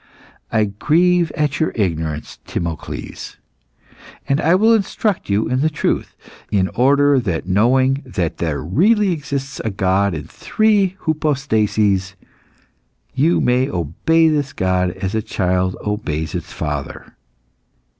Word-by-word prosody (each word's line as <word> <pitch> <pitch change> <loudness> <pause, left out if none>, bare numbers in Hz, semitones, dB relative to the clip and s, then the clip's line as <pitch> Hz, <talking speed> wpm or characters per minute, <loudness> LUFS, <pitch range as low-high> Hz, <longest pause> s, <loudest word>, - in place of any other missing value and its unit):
I 110 -1 +2
grieve 165 - +2
at 150 -3 -1
your 160 - +1
ignorance, 80 -7 -2
Timocles, 85 -3 -5 0.9
and 140 +2 +1
I 165 +3 +4
will 220 +4 +4
instruct 210 - -1
you 100 +2 +1
in 130 +2 0
the 155 - +2
truth, 150 - -2 0.3
in 95 -2 +1
order 140 +6 +3
that 90 -10 -2
knowing 130 +8 +2
that 90 -10 -3
there 80 -4 -2
really 195 - +3
exists 140 -3 -4
a 110 - -1
God 95 -1 +1
in 75 - -5
three 200 - +1
hypostases, 110 -11 0 1.0
you 155 +6 +2
may 125 +2 +2
obey 95 - +1
this 145 -4 0
God 90 -1 +1
as 95 +2 -4
a 110 - 0
child 95 -3 -1
obeys 80 -7 -3
its - - -5
father." 75 -3 -5
115 Hz, 125 wpm, -19 LUFS, 95-150 Hz, 1.0 s, I